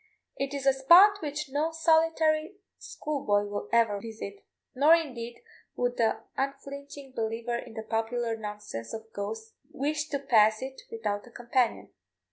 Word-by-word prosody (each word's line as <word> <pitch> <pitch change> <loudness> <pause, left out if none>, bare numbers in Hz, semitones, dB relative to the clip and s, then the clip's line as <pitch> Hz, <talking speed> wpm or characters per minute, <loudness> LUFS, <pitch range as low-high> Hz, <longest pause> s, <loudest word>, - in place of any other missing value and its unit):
It 275 +1 -3
is 275 -1 -4
a 270 - +6
spot 360 +10 +7
which 295 -1 -4
no 300 +4 0
solitary 320 +1 +2 0.2
schoolboy 265 -9 -1
will 205 0 -5
ever 225 -4 +3
visit, 215 -3 -8 0.3
nor 295 +5 +6
indeed 245 - -5 0.3
would 245 0 -1
the 225 -2 +1
unflinching 275 0 -5
believer 230 0 -2
in 235 -1 -7
the 220 - -5
popular 225 +1 -1
nonsense 210 - -7
of 220 0 -10
ghosts 220 +2 -5 0.2
wish 295 +2 -2
to 285 - 0
pass 220 -5 +4
it 265 0 -7
without 245 - -3
a - - -12
companion. 240 0 -1
250 Hz, 145 wpm, -28 LUFS, 225-295 Hz, 0.3 s, spot